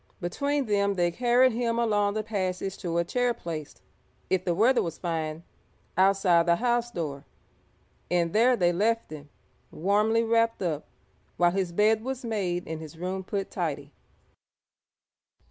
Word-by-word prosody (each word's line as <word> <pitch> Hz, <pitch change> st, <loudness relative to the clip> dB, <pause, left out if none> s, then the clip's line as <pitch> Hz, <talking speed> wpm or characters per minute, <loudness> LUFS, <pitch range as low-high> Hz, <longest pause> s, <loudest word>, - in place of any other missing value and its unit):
Between 280 Hz, +10 st, -1 dB
them 200 Hz, -2 st, +1 dB
they 175 Hz, -1 st, +1 dB
carried 245 Hz, +5 st, +3 dB
him 230 Hz, 0 st, -1 dB
along 205 Hz, -3 st, +1 dB
the 215 Hz, -, -1 dB
passage 190 Hz, -2 st, -3 dB
to 170 Hz, -1 st, -2 dB
a 170 Hz, -, +3 dB
chair 245 Hz, +6 st, 0 dB
placed, 155 Hz, -3 st, -7 dB, 0.5 s
if 185 Hz, -1 st, +2 dB
the 175 Hz, -2 st, 0 dB
weather 240 Hz, +7 st, +4 dB
was 165 Hz, -2 st, -4 dB
fine, 160 Hz, -2 st, -3 dB, 0.5 s
outside 185 Hz, -2 st, +4 dB
the 170 Hz, -, +5 dB
house 240 Hz, +3 st, 0 dB
door, 150 Hz, -9 st, -5 dB, 0.9 s
and 170 Hz, -2 st, +1 dB
there 245 Hz, +4 st, +4 dB
they 175 Hz, -3 st, +2 dB
left 225 Hz, +4 st, 0 dB
him, 150 Hz, -1 st, -9 dB, 0.4 s
warmly 210 Hz, +6 st, +1 dB
wrapped 230 Hz, -2 st, +1 dB
up, 155 Hz, -4 st, -2 dB, 0.5 s
while 175 Hz, 0 st, +4 dB
his 185 Hz, -1 st, -1 dB
bed 215 Hz, +4 st, +2 dB
was 260 Hz, 0 st, -4 dB
made 185 Hz, -6 st, -2 dB
and 160 Hz, 0 st, -5 dB
his 160 Hz, 0 st, -10 dB
room 185 Hz, +2 st, -3 dB
put 195 Hz, +1 st, -4 dB
tidy. 145 Hz, -5 st, -3 dB
195 Hz, 150 wpm, -27 LUFS, 170-230 Hz, 0.9 s, the